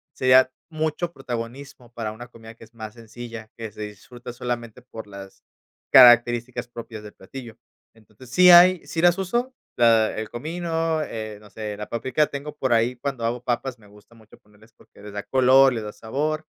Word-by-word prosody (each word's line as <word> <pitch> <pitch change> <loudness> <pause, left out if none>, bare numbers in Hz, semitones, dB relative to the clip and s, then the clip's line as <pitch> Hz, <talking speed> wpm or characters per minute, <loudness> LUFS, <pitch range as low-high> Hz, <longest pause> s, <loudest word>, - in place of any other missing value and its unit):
sería 130 0 +5 0.2
mucho 160 +2 -2
protagonismo, 125 0 -7
para 110 -3 -5
una 120 +3 -10
comida 115 -1 -14
que 115 - -17
es 115 - -18
más 110 -2 -8
sencilla, 115 -1 -10
que 115 -2 -7
se 105 - -11
disfruta 115 +4 -9
solamente 120 -1 -5
por 115 -3 -11
las 100 -1 -12 0.5
características 120 -1 +6
propias 115 -2 -9
del 105 - -11
platillo. 115 +3 -11 0.4
Entonces 110 +2 -18
sí 180 +6 +6
hay, 175 0 +7
sí 165 - -3
las 175 +1 +4
uso, 240 +7 -2 0.2
la 115 -2 +3
el 110 -1 -5
comino, 165 +4 -2
eh, 110 -6 -6
no 105 - -16
sé, 105 0 -6
la 105 - -7
paprika 130 +5 0
tengo 145 +2 -7
por 130 -5 0
ahí, 115 +2 +2
cuando 125 -2 -4
hago 120 +1 -2
papas, 125 0 -3
me 105 - -19
gusta 105 +3 -20
mucho 110 -1 -19
ponerles 105 +2 -24
porque - - -21
les 105 0 -10
da 105 0 -5
color, 130 0 +5
les 115 - -4
da 105 - -6
sabor, 150 +9 -3
120 Hz, 185 wpm, -23 LUFS, 110-135 Hz, 0.5 s, hay